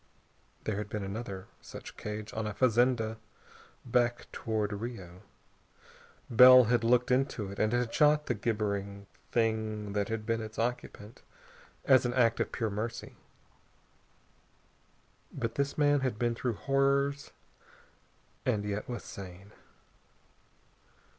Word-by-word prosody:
There 105 -2 -2
had 105 0 -4
been 105 -2 -4
another 95 -1 -6 0.2
such - - -10
cage 105 0 -6
on 110 -1 -3
a 105 - -5
fazenda 120 -2 +2 0.7
back 120 -1 +1
toward 110 -2 -2
Rio. 100 -5 -7 1.1
Bell 125 +2 +9
had 120 0 +1
looked 125 +2 +3
into 125 -6 0
it, 100 - -8
and 110 - +2
had 120 -1 0
shot 150 0 +4
the - - 0
gibbering 100 -3 -2 0.3
Thing 110 -3 -1
that 100 -1 -1
had 110 -1 -3
been 115 0 -1
its 110 0 -8
occupant, 115 -2 -4 0.6
as 130 -2 +6
an 120 -1 -1
act 115 -3 +3
of - - -1
pure 110 -3 -2
mercy. 110 +3 -5 2.2
But 115 -1 -3
this 140 0 -2
man 145 -1 +4
had 130 -5 -2
been 120 +1 0
through 120 0 -2
horrors 140 +2 +1 1.1
and 105 -1 0
yet 105 +2 -4
was 120 - -5
sane. 95 +1 -10
115 Hz, 125 wpm, -30 LUFS, 105-125 Hz, 2.2 s, Bell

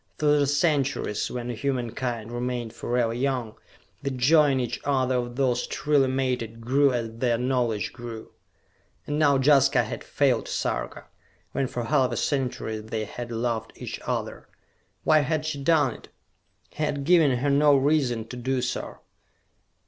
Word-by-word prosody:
Through 150 -1 +3
the 140 - +2
centuries, 140 -7 0
when 120 -1 -5
humankind 120 -2 -3
remained 120 -1 -3
forever 120 -1 -1
young, 125 -3 -1 0.5
the 140 - -2
joy 145 +4 +4
in 135 -1 +1
each 120 -2 -2
other 130 -2 +1
of 120 -1 -2
those 125 -2 +1
truly 145 -3 +2
mated 125 -4 -2
grew 135 +4 +3
as 115 -2 -4
their 120 -2 +2
knowledge 125 -4 -1
grew.... 120 -2 -8 0.7
And 145 +1 -2
now 145 -3 +4
Jaska 135 -1 +4
had 110 - -6
failed 135 -5 +1
Sarka, - - -3 0.5
when 135 - -1
for 120 -1 -4
half 130 +1 +2
a - - -2
century 125 -5 -1
they 110 0 -4
had 120 +3 -7
loved 115 -1 -2
each - - -6
other! - - -4 0.6
Why 155 0 +5
had 150 +1 -1
she 150 -3 -3
done 150 -6 +3
it? - - -14 0.6
He 155 - -4
had 145 -2 -1
given 155 -5 +4
her 140 +3 0
no 145 +1 +5
reason 135 -5 +1
to - - -7
do 125 +1 -1
so. - - -4
130 Hz, 155 wpm, -26 LUFS, 120-140 Hz, 0.7 s, Why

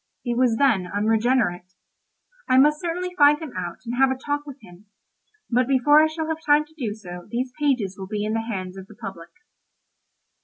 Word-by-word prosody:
He 240 - -1
was 245 -1 +2
then 225 -10 +2
unregenerate. 210 -3 0 0.7
I 255 - +4
must 300 +3 +4
certainly 360 +1 -3
find 295 -2 +6
him 315 -5 -7
out 175 -2 -5
and 235 - -4
have 270 0 +5
a 265 - -1
talk 290 +2 -3
with 280 -1 -9
him; 185 0 -16 0.6
but 250 0 +1
before 275 +3 +5
I 315 - +4
shall 315 0 -4
have 320 0 -3
time 295 0 +4
to 310 - -25
do 230 -9 -3
so 180 -4 -10
these 250 +1 -3
pages 245 -10 0
will 190 - -6
be 210 +1 -3
in 215 - -2
the 225 - 0
hands 185 -3 -5
of 190 0 -10
the 215 - -15
public. 180 -5 -9
245 Hz, 200 wpm, -23 LUFS, 200-290 Hz, 0.7 s, find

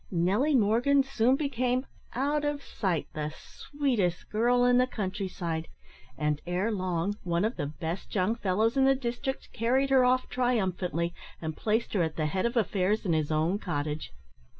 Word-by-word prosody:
Nelly 200 - +2
Morgan 245 +5 +4
soon 255 -1 +2
became, 255 -2 0 0.3
out 290 +4 0
of 290 -1 -2
sight, 180 -7 -1
the 155 -1 -2
sweetest 245 - -2
girl 245 +3 +3
in 245 0 +5
the 255 - +3
countryside, 185 -7 -3 0.5
and, 150 -1 0
ere 185 +5 0
long, 185 0 -1
one 170 +2 0
of 225 - -1
the 145 - -2
best 165 +6 -5
young 190 +3 +2
fellows 215 +2 +1
in 270 -1 +4
the 270 0 +5
district 260 +1 -4
carried 260 +4 +1
her 260 -1 +6
off 255 +1 +3
triumphantly, 185 - 0 0.3
and 160 -1 -4
placed 220 +2 0
her 195 - +2
at 160 -1 -1
the 155 - -1
head 185 +8 0
of 235 +1 -3
affairs 210 0 +1
in 175 - +2
his 155 -1 0
own 160 +6 +1
cottage. 150 -5 -3
210 Hz, 170 wpm, -29 LUFS, 175-250 Hz, 0.5 s, her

